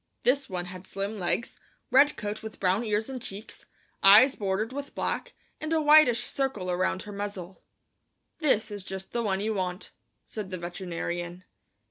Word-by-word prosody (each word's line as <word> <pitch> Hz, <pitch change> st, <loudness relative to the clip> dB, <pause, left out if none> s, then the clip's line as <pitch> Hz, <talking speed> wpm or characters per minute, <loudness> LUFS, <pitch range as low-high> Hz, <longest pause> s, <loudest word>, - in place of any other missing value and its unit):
This 275 Hz, +2 st, +2 dB
one 180 Hz, -2 st, -3 dB
had 185 Hz, +1 st, -9 dB
slim 200 Hz, +2 st, -4 dB
legs, 185 Hz, +6 st, -1 dB, 0.3 s
red 280 Hz, +3 st, +5 dB
coat 210 Hz, 0 st, -4 dB
with 220 Hz, -1 st, -8 dB
brown 190 Hz, +4 st, +2 dB
ears 215 Hz, -1 st, 0 dB
and 260 Hz, -2 st, -6 dB
cheeks, 205 Hz, 0 st, -8 dB, 0.3 s
eyes 215 Hz, +8 st, +8 dB
bordered 205 Hz, +4 st, -1 dB
with 285 Hz, +1 st, -6 dB
black, -, -, -2 dB, 0.2 s
and 310 Hz, 0 st, -4 dB
a 320 Hz, -, +3 dB
whitish 300 Hz, -6 st, +6 dB
circle 240 Hz, -10 st, -2 dB
around 185 Hz, +1 st, 0 dB
her 210 Hz, -, -8 dB
muzzle. 200 Hz, -3 st, -6 dB, 0.8 s
"This 225 Hz, -9 st, +2 dB
is 205 Hz, -2 st, -6 dB
just 190 Hz, 0 st, -6 dB
the 235 Hz, -, -1 dB
one 195 Hz, -3 st, 0 dB
you 220 Hz, +1 st, 0 dB
want," 185 Hz, -1 st, -3 dB, 0.3 s
said 210 Hz, -3 st, -6 dB
the 185 Hz, -, -4 dB
veterinarian. 175 Hz, 0 st, -5 dB
205 Hz, 165 wpm, -28 LUFS, 185-235 Hz, 0.8 s, eyes